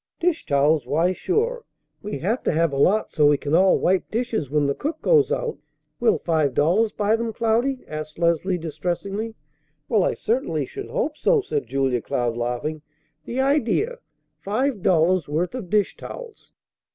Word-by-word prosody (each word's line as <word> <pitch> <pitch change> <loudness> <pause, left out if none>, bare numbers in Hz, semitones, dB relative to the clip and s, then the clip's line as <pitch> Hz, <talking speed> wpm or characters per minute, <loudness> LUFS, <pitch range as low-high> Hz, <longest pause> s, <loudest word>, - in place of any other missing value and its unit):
"Dish 340 -1 0
towels! 145 -1 +2
Why, 165 +7 +2
sure. 465 - -1 0.4
We 205 -7 -4
have 210 - -1
to - - +3
have 165 -1 +1
a - - -1
lot 195 +10 +2
so 150 -3 +4
we 145 0 +4
can 145 +2 -4
all 185 +3 +5
wipe 185 +1 +1
dishes 220 - -2
when 150 0 +1
the 140 - +1
cook 310 - -4
goes 455 -4 +4
out. 470 -2 -2 0.4
Will 445 - +3
five 155 -6 0
dollars 195 +9 +3
buy 210 +1 +1
them, 230 0 -2
Cloudy?" 235 +4 0
asked 155 0 -6
Leslie 170 +2 +1
distressingly. 195 +7 -4 0.5
"Well, - - +3
I - - 0
certainly 465 +3 -1
should 405 -1 -8
hope 320 -12 -2
so!" 480 -3 +3
said 425 +2 -3
Julia 135 -3 0
Cloud, 120 0 -1
laughing. 125 +6 -3 0.4
"The 255 +3 -1
idea! 290 - +1 0.4
Five 230 +2 -1
dollars' 175 0 +3
worth 165 +7 -1
of 240 -9 -6
dish 210 0 +1
towels!" 475 -4 -10
190 Hz, 170 wpm, -23 LUFS, -, 0.5 s, all